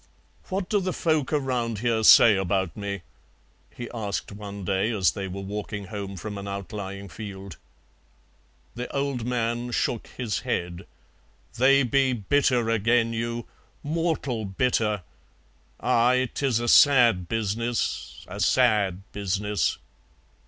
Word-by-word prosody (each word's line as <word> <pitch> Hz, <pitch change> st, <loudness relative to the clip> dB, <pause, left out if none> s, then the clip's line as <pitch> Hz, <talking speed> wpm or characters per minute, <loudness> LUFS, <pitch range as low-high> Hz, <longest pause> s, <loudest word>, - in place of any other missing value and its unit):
"What 190 Hz, -1 st, -2 dB
do 205 Hz, -, +2 dB
the 185 Hz, -1 st, -2 dB
folk 155 Hz, -5 st, 0 dB
around 125 Hz, -6 st, -1 dB
here 115 Hz, 0 st, 0 dB
say 110 Hz, 0 st, +8 dB
about 95 Hz, -1 st, -1 dB
me?" 100 Hz, -3 st, -5 dB, 0.7 s
he 120 Hz, -, -8 dB
asked 110 Hz, -3 st, -4 dB
one 100 Hz, -1 st, -8 dB
day 95 Hz, +4 st, +1 dB
as 100 Hz, -6 st, +2 dB
they 100 Hz, -2 st, -5 dB
were 95 Hz, +1 st, -6 dB
walking 105 Hz, +1 st, -5 dB
home 100 Hz, -2 st, -5 dB
from 105 Hz, +2 st, -6 dB
an 100 Hz, -, -7 dB
outlying 100 Hz, 0 st, -6 dB
field. 95 Hz, 0 st, -8 dB, 1.2 s
The 125 Hz, +1 st, -6 dB
old 140 Hz, -4 st, -1 dB
man 120 Hz, 0 st, -1 dB
shook 120 Hz, -1 st, -1 dB
his 120 Hz, -5 st, -3 dB
head. 85 Hz, 0 st, -3 dB, 0.7 s
"They 135 Hz, +2 st, +5 dB
be 130 Hz, +1 st, +2 dB
bitter 125 Hz, +1 st, +1 dB
agen 115 Hz, +1 st, +2 dB
you, 115 Hz, +1 st, -3 dB, 0.4 s
mortal 155 Hz, -7 st, -1 dB
bitter. 105 Hz, -1 st, 0 dB, 0.8 s
Aye, 125 Hz, +2 st, +2 dB
'tis 130 Hz, -5 st, 0 dB
a 120 Hz, -, -3 dB
sad 120 Hz, -10 st, +5 dB
business, 115 Hz, +2 st, -2 dB
a 95 Hz, +3 st, -8 dB
sad 105 Hz, -6 st, +2 dB
business." 105 Hz, +1 st, -1 dB
110 Hz, 125 wpm, -25 LUFS, 100-125 Hz, 1.2 s, say